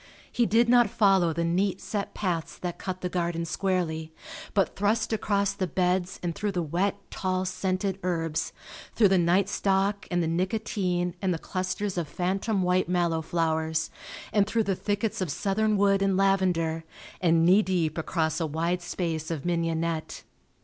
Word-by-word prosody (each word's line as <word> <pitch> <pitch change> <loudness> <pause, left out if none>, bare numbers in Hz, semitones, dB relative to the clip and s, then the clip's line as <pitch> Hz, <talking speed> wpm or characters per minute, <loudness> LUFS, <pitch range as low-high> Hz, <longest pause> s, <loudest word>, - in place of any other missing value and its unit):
He 240 -2 +2
did 230 +2 +4
not 240 -2 +5
follow 195 -5 +3
the 170 +1 -1
neat 185 +3 +1
set 205 -2 -4
paths 175 -5 -2
that 175 -1 -5
cut 185 -1 -5
the 180 - -1
garden 170 -2 -1
squarely, 160 -2 -1 0.4
but 195 -2 +2
thrust 220 +3 +1
across 200 -2 +1
the 185 - -2
beds 180 +2 0
and 170 -1 -1
through 205 +3 -2
the 175 -2 0
wet, 180 +6 0 0.2
tall, 185 0 -1
scented 185 +1 -1
herbs, 165 -3 -1 0.4
through 210 -4 +5
the 190 -1 +4
night 180 +3 +3
stock 195 -1 0
and 175 -1 +1
the - - 0
nicotine 180 0 -1
and 190 -2 +1
the - - -3
clusters 185 +2 -3
of 165 - -3
phantom 190 +5 -1
white 180 0 +2
mallow 170 -2 +1
flowers 160 -1 -1 0.4
and 205 -2 +3
through 225 +1 +1
the 195 -2 0
thickets 205 +2 -2
of 185 - -1
southern 210 +7 +1
wood 195 0 +3
and 195 -1 +2
lavender, 180 -5 +2 0.4
and 165 -2 +4
knee 190 +4 +6
deep 175 -6 0
across 160 -1 -1
a 165 - 0
wide 170 +4 -1
space 165 -3 -3
of 165 -3 -4
mignonette. 165 -1 -1
185 Hz, 170 wpm, -27 LUFS, 165-195 Hz, 0.4 s, knee